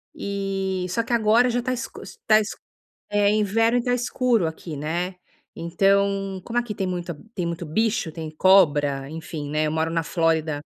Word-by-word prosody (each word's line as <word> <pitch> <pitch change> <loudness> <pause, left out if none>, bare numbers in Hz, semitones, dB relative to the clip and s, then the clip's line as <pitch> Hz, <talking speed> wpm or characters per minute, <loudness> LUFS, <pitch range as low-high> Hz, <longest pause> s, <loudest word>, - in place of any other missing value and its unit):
E 195 -2 -2
só 230 +5 0
que 240 - -3
agora 230 +2 +4
já 245 +1 0
tá 255 +1 -2
escu 250 - -6 0.3
tá 215 0 +7
escu 210 - -4 0.5
é 205 0 +3
inverno 225 +3 +2
e - - -1
tá 245 0 +2
escuro 245 -5 +1
aqui, 160 -1 -6
né. 170 +5 -2 0.4
Então, 195 +2 +1
como 240 0 -2
aqui 240 -3 -1
tem 190 - -2
muita 175 -3 -4 0.2
tem 180 -3 -2
muito 170 0 -4
bicho, 215 -1 0
tem 160 -1 -6
cobra, 145 -6 +3
enfim, 160 -2 -6
né, 155 +1 +1
eu 150 - -1
moro 160 +1 0
na 165 0 0
Flórida, 160 -3 0
190 Hz, 180 wpm, -24 LUFS, 160-215 Hz, 0.5 s, tá